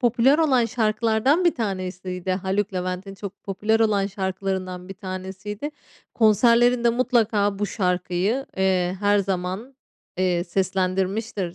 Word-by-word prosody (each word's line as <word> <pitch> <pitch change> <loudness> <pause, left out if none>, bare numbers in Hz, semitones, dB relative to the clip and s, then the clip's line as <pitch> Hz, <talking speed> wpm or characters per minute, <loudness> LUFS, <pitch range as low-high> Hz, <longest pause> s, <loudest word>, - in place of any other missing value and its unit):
popüler 250 +4 +4
olan 265 -7 +3
şarkılardan 230 +7 +1
bir 345 - +4
tanesiydi. 185 -4 -4
Haluk 195 +2 -1
Levent'in 185 +2 -4
çok 200 0 -9
popüler 210 +3 0
olan 205 -3 +2
şarkılarından 190 -1 -4
bir 195 - -7
tanesiydi. 190 +6 -6 0.4
Konserlerinde 235 +2 +4
mutlaka 225 -5 +1
bu 205 - 0
şarkıyı, 185 +5 -1
eee, 185 -1 +1
her 205 0 +3
zaman, 190 +6 -3 0.4
eee, 180 -1 +1
seslendirmiştir 190 +1 -1
195 Hz, 115 wpm, -23 LUFS, 185-225 Hz, 0.4 s, popüler